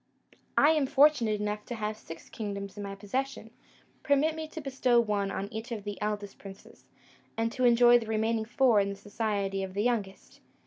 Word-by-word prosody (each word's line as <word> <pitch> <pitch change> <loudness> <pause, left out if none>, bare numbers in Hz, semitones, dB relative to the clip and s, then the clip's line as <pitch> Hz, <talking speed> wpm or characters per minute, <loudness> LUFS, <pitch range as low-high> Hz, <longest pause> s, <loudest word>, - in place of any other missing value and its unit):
I 295 - +6
am 300 -4 +2
fortunate 260 -7 +4
enough 210 0 -3
to 240 - -5
have 215 -1 -3
six 165 -6 -11
kingdoms 200 -2 -6
in 205 - -7
my 200 -1 -5
possession; 225 +3 -4 0.5
permit 285 +3 +2
me 315 0 -5
to 315 - -8
bestow 260 -4 +2
one 205 -3 0
on 195 0 -3
each 225 +3 -6
of 215 -3 -4
the 205 0 -6
eldest 205 -1 -3
princes, 195 0 -13 0.5
and 225 0 0
to 255 0 0
enjoy 240 0 +6
the 225 - -8
remaining 220 0 0
four 245 -1 +3
in 200 0 +1
the 200 - -4
society 200 -1 -2
of 190 0 -6
the 205 - 0
youngest. 215 -5 -3
220 Hz, 190 wpm, -29 LUFS, 205-245 Hz, 0.5 s, I